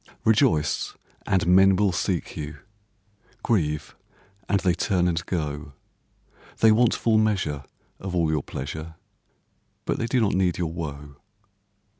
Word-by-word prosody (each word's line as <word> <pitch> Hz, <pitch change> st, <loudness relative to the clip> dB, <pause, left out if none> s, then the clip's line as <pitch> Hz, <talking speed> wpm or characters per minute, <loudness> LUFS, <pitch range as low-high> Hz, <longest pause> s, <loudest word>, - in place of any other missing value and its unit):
Rejoice, 110 Hz, -, +2 dB, 0.3 s
and 95 Hz, -3 st, +2 dB
men 95 Hz, +2 st, +6 dB
will 100 Hz, 0 st, +2 dB
seek 90 Hz, 0 st, -2 dB
you; 75 Hz, 0 st, -6 dB, 0.9 s
Grieve, 75 Hz, -10 st, 0 dB, 0.5 s
and 100 Hz, -, +3 dB
they 90 Hz, -3 st, +2 dB
turn 90 Hz, -1 st, +1 dB
and 85 Hz, -1 st, -1 dB
go; 75 Hz, -4 st, -3 dB, 0.9 s
They 110 Hz, -, +6 dB
want 115 Hz, +1 st, +4 dB
full 110 Hz, -2 st, +2 dB
measure 90 Hz, -10 st, 0 dB, 0.3 s
of 95 Hz, -1 st, -5 dB
all 80 Hz, -3 st, +2 dB
your 75 Hz, -2 st, 0 dB
pleasure, 80 Hz, +5 st, -6 dB, 0.9 s
But -, -, -1 dB
they 115 Hz, -, -1 dB
do 125 Hz, +2 st, +1 dB
not 105 Hz, -3 st, +2 dB
need 90 Hz, -2 st, +1 dB
your 85 Hz, -2 st, -2 dB
woe. 75 Hz, -4 st, -7 dB
90 Hz, 135 wpm, -25 LUFS, 75-100 Hz, 0.9 s, men